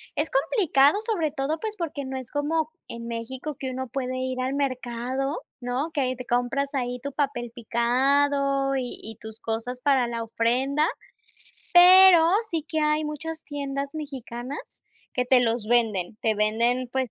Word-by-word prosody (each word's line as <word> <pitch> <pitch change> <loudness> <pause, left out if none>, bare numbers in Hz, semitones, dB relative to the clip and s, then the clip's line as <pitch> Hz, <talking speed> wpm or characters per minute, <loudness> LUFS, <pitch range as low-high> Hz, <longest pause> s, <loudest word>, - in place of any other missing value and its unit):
es 300 - 0
complicado, 285 - +3
sobre 340 -10 0
todo 305 +2 -2
pues 435 -1 -4
porque 305 -6 -4
no 265 0 -4
es 255 -2 -8
como 310 +2 -1 0.2
en 235 0 -7
México 260 +5 -5
que 265 - -3
uno 260 0 -4
puede 255 0 -3
ir 255 0 -3
al 255 +1 -1
mercado, 260 0 -2 0.2
¿no? 250 +6 -2
Que 290 - 0
ahí 255 -1 0
te 255 0 -8
compras 245 +4 0
ahí 250 -2 -2
tu 280 +2 -5
papel 260 -5 -2
picado 275 +4 +1
y 250 -2 -4
y 220 -1 -8
tus 220 0 -10
cosas 235 +3 -4
para 270 -4 +3
la 230 -1 -3
ofrenda. 255 +7 +1 0.9
Pero 360 -1 +8 0.2
sí 325 -3 -2
que 315 -1 -1
hay 300 0 +2
muchas 320 +2 -5
tiendas 280 0 -4
mexicanas 270 -3 -6 0.5
que 250 - 0
te 250 0 +5
los 230 -2 0
venden, 215 -5 +1
te 220 -1 +2
venden, 235 +4 +1
pues 260 -3 -1
265 Hz, 165 wpm, -25 LUFS, 240-290 Hz, 0.9 s, Pero